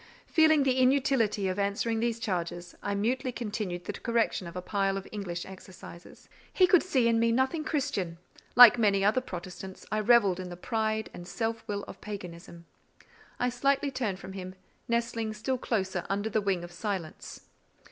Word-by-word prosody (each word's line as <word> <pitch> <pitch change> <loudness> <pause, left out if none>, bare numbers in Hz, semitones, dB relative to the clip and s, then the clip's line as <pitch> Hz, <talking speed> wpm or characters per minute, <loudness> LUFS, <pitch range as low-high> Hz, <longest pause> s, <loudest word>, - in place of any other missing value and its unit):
Feeling 315 -2 +4
the 260 -1 +2
inutility 255 -6 +2
of 185 +2 -2
answering 200 +3 0
these 230 0 -1
charges, 175 -4 -3
I 200 0 -2
mutely 250 +5 0
continued 205 -7 -4
the 205 - -4
correction 230 -5 -1
of 170 - -9
a - - -2
pile 195 -1 0
of 195 - -7
English 180 -5 -4
exercises. 185 -2 -12 0.2
"He 370 - +5
could 360 -1 +5
see 260 -10 +2
in 230 -1 +3
me 230 0 +3
nothing 260 +6 +1
Christian: 265 - -2 0.4
like 245 -1 +10
many 200 -3 +3
other 220 +5 +3
Protestants, 185 -2 -8
I 215 - +1
revelled 210 -4 +4
in 185 -1 -5
the 175 - -8
pride 220 +2 -2
and 175 0 -9
self 225 +2 -3
will 205 -2 -3
of - - -11
paganism." 170 -4 -8 0.7
I 245 - +2
slightly 275 +3 +1
turned 220 -8 -2
from 190 0 -9
him, 185 -1 -7 0.3
nestling 235 -2 -1
still 255 +4 -2
closer 190 -7 -1
under 205 +2 -1
the 215 - +1
wing 195 -3 0
of 175 - -8
silence. 185 -3 -5
210 Hz, 175 wpm, -29 LUFS, 190-240 Hz, 0.7 s, like